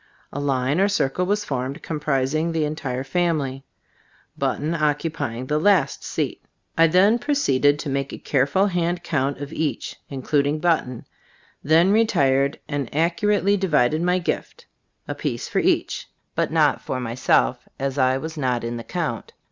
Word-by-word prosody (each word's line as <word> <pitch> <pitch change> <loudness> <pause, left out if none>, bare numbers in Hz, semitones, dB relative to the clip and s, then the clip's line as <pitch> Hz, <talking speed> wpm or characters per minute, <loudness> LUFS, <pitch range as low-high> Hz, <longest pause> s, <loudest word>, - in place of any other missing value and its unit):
A 145 - -3
line 140 +2 0
or 195 - +4
circle 180 -3 0
was 205 +1 0
formed, 135 -1 -3
comprising 150 +1 0
the 160 -2 0
entire 135 -4 -3
family, 140 -4 -1 0.7
Button 155 +3 -1
occupying 150 -6 -1
the 150 +3 0
last 200 +2 +2
seat. - - -3 0.3
I 165 0 +6
then 195 +8 +4
pro 290 +4 0
ceeded 145 - +3
to 150 - -6
make 140 0 -2
a - - -6
careful 140 +8 +1
hand 175 -2 -1
count 140 -4 -1
of 145 0 -7
each, 155 -2 -3
including 145 +2 0
Button; 155 -7 0 0.6
then 165 +6 +4
re 220 +2 +5
tired 135 -4 +2
and 145 -4 -3
accurately 195 +5 +2
divided 155 -6 +2
my 180 +1 +2
gift, 180 - -4 0.4
a - - -2
piece - - -3
for - - 0
each, - - 0 0.2
but - - 0
not - - +2
myself, 120 - +1
as 135 +1 -2
I 130 0 +3
was 160 +4 -6
not 125 -5 -1
in 120 0 -3
the 115 - -6
count. - - -4
150 Hz, 155 wpm, -23 LUFS, 135-170 Hz, 0.7 s, I